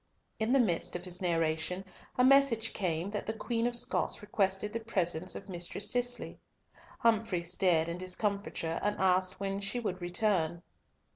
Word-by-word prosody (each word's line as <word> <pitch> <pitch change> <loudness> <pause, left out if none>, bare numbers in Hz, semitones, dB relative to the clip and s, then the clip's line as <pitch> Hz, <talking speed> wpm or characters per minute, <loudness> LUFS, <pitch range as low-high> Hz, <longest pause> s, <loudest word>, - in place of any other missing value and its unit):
In 220 +2 +1
the 275 - +5
midst 180 -10 +1
of 175 - -4
his 180 +1 +1
narration 165 +1 0 0.3
a 250 - +5
message 260 -4 +5
came 180 -1 -1
that 210 - -4
the 220 - -1
Queen 230 +1 -1
of 245 - -2
Scots 235 - +1
requested 205 0 0
the 230 - -1
presence 185 -6 -1
of 195 - -8
Mistress 180 +2 -3
Cicely. 245 0 -1 0.6
Humfrey 220 -6 +2
stared 175 -2 +2
in 170 +1 -4
discomfiture, 185 -3 -2
and 205 0 0
asked 185 0 +2
when 195 0 -2
she 200 +5 -1
would 190 -6 -3
return. 175 -2 0
195 Hz, 160 wpm, -31 LUFS, 175-220 Hz, 0.6 s, the